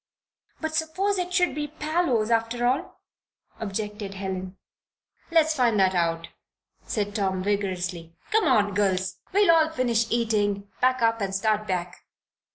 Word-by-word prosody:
"But 315 -1 -3
suppose 365 +5 0
it 360 0 -3
should 360 -3 +2
be 295 +1 -3
Parloe's 300 -7 0
after 230 +1 +1
all?" 255 +3 -1 0.6
objected 210 -1 -4
Helen. 190 -1 -5 0.7
"Let's 320 -2 +4
find 240 -6 +2
that 190 -1 +4
out," 165 -2 0 0.6
said 205 -3 -2
Tom, 190 -3 -1
vigorously. 185 -4 -2 0.2
"Come 440 -1 +3
on, 210 -8 +3
girls. 190 -2 0
We'll 335 -5 +5
finish 240 -6 +1
eating, 205 -4 0
pack 255 -1 +2
up, 230 -1 +2
and 195 -1 -2
start 215 +1 0
back. 180 -1 -3
220 Hz, 135 wpm, -25 LUFS, 195-295 Hz, 0.7 s, We'll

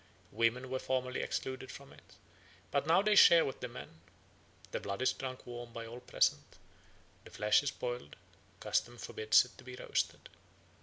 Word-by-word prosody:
Women 115 +4 0
were 130 - -1
formerly 130 -1 -1
excluded 130 0 -4
from 140 -1 -12
it, - - -19 0.6
but 140 +1 0
now 170 +4 +5
they 215 0 +3
share 170 -5 +8
with 135 - -5
the 125 - -4
men. 120 -10 -11 0.7
The - - -2
blood 100 +1 -4
is - - +3
drunk 130 -1 -6
warm 120 -1 -8
by 115 -1 -6
all 115 +2 -8
present; - - 0 0.7
the - - -13
flesh 105 0 +3
is 145 - -1
boiled, 120 - -5 0.4
custom 120 0 -1
forbids 110 +1 +3
it 125 - -16
to - - -12
be 125 0 -9
roasted. - - -2
125 Hz, 170 wpm, -33 LUFS, 115-130 Hz, 0.7 s, share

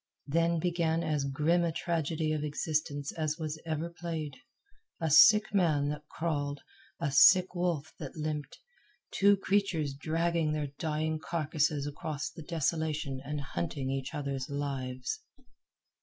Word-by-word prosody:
Then 165 +3 +2
began 170 -1 0
as 150 -4 0
grim 155 +5 +2
a 170 - +1
tragedy 160 -1 -1
of 150 -1 -2
existence 150 -1 -2
as 155 -1 -2
was 155 -1 -4
ever 160 +1 -1
played 165 -4 -5 0.6
a 160 -2 0
sick 210 +8 +7
man 155 -7 +2
that 150 0 -5
crawled, 145 -3 -2 0.4
a 140 - -1
sick 180 +7 +7
wolf 175 -4 -1
that 145 -4 -7
limped, 150 -2 -4 0.5
two 200 0 +4
creatures 190 -7 0
dragging 165 +2 0
their 150 -2 -2
dying 155 0 -1
carcasses 155 -3 0
across 145 0 -4
the - - -10
desolation 155 -3 -1
and 145 +1 -3
hunting 135 - -3
each 135 +3 -3
other's 140 -3 -3
lives. 140 - -3
155 Hz, 135 wpm, -31 LUFS, 145-165 Hz, 0.6 s, sick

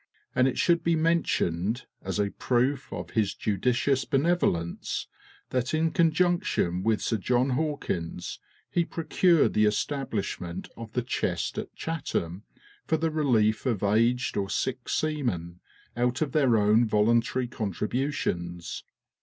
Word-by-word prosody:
And 130 0 +4
it 130 - -1
should 170 -1 +3
be 170 0 +3
mentioned, 125 - 0 0.2
as 95 +2 -3
a 100 -1 0
proof 130 +2 0
of - - -6
his 105 -3 0
judicious 125 +6 +1
benevolence, 135 - 0 0.5
that 130 +3 0
in 160 +1 +1
conjunction 165 - +2
with 110 +2 +1
Sir 115 - +1
John 125 +5 +1
Hawkins, 130 - -3 0.3
he 175 - +2
procured 170 0 +2
the 105 0 +4
establishment 105 -6 -2
of 115 -1 -9
the 125 - 0
Chest 120 - -2
at - - -7
Chatham 100 - -3 0.5
for 160 - +2
the 160 +1 0
relief 125 -7 +2
of 110 -6 0
aged 115 +5 +2
or 100 -1 -1
sick 130 +2 -2
seamen, 115 - -1 0.4
out 125 +4 +1
of 145 - -4
their 130 -6 +3
own 105 +2 +4
voluntary 115 +4 +2
contributions. 105 - -3
125 Hz, 130 wpm, -27 LUFS, 105-150 Hz, 0.5 s, And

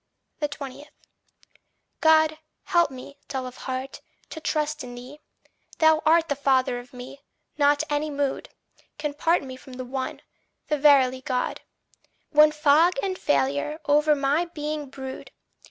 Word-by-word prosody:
20. 290 -1 -6 1.1
God, 315 -1 +4 0.2
help 345 -5 +3
me, 270 +2 -11
dull 265 -2 -4
of 250 0 -9
heart, 260 +1 -5 0.3
to 320 - -6
trust 305 -1 -1
in 245 -1 -8
thee. 255 +5 -11 0.6
Thou 315 -1 +4
art 330 +1 +5
the 285 - -1
father 260 -3 +1
of 245 0 -13
me 255 +2 -10 0.4
not 290 +1 +4
any 295 +1 -1
mood 285 -2 -2 0.5
Can 300 -1 -3
part 330 +3 +1
me 260 -1 -8
from 260 0 -13
the 255 0 -6
One, 260 +1 -5 0.5
the 300 - +1
verily 265 -3 +5
Good. 255 -1 -2 0.7
When 300 0 +6
fog 305 +3 +4
and 380 -1 -1
failure 140 - 0
o'er 300 +1 +4
my 285 +4 +1
being 300 -3 -5
brood. 265 0 -8
285 Hz, 140 wpm, -25 LUFS, 260-305 Hz, 1.1 s, When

